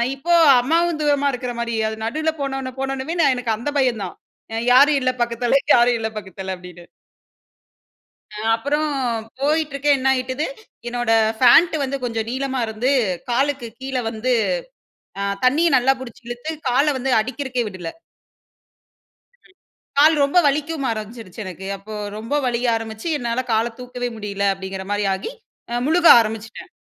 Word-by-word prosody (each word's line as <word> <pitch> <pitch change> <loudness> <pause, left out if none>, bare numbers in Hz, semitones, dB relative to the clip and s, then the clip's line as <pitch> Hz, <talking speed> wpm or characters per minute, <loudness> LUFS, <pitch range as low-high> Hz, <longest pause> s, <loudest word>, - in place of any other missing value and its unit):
இப்போ 335 +6 -1 0.3
அம்மாவும் 330 +4 +1
தூரமா 285 -1 +2
இருக்ற 250 0 -4
மாரி. 235 0 -2
அது 220 - -4
நடுவுல 310 +7 -1
போனோன்னே 270 -1 -3
போனொனமே 270 +4 -3 0.2
எனக்கு 240 -3 -1
அந்த 240 +6 -3
பயம் 250 -5 +1
தான். - - -8 0.4
அ - - -2 0.2
"யாரும் 285 +3 +6
இல்ல 255 0 +2
பக்கத்துல, 240 +2 +1 0.2
யாரும் 240 0 +4
இல்ல 220 0 -2
பக்கத்துல." 190 -1 -6
அப்டின்னு. 180 -1 -12 1.5
அ - - -5 0.2
அப்புறோம் 295 +5 -1 0.5
போயிட்டுருக்கேன். 290 -1 +1
என்ன 265 0 0
ஆயிட்டுது, 260 +3 -2 0.4
என்னோட 240 -1 -1 0.3
ஃபேண்ட் 265 +8 +6
வந்து 275 0 -2
கொஞ்சம் 225 -2 -2
நீளமா 265 0 -2
இருந்து, 220 +4 -1 0.4
காலுக்கு 270 0 0
கீழ 265 0 -5 0.2
வந்து 230 +3 -1 0.9
அ - - -1 0.2
தண்ணிய 300 +7 +4
நல்லா 260 +1 +4
புடிச்சி 250 -2 -10
இழுத்து 240 +6 -5 0.2
கால்ல 275 +5 +3
வந்து 265 +1 -2
அடிக்கிறக்கே 255 +2 -3
விடல. 185 -4 -7 1.6
ம். - - -24 0.5
கால் 310 +3 +6
ரொம்ப 280 +5 +1
வலிக்கவும் 290 0 -1
ஆரம்பிச்சிடுச்சு 220 -2 -7
எனக்கு. 185 +1 -8
அப்போ 215 +2 -9 0.2
ரொம்ப 225 +5 -5
வலிக்க 245 0 0
ஆரம்பிச்சி 225 +3 -5
என்னால 240 0 -2
கால 225 +2 +1
தூக்கவே 250 0 -4
முடியல 200 -1 -3
அப்படிங்கற 190 0 -7
மாரி 205 0 0
ஆகி, 190 - -5 0.6
முழுக 335 +2 +4
ஆரம்பிச்சிட்டேன். 225 0 -4
250 Hz, 140 wpm, -21 LUFS, 225-280 Hz, 1.6 s, யாரும்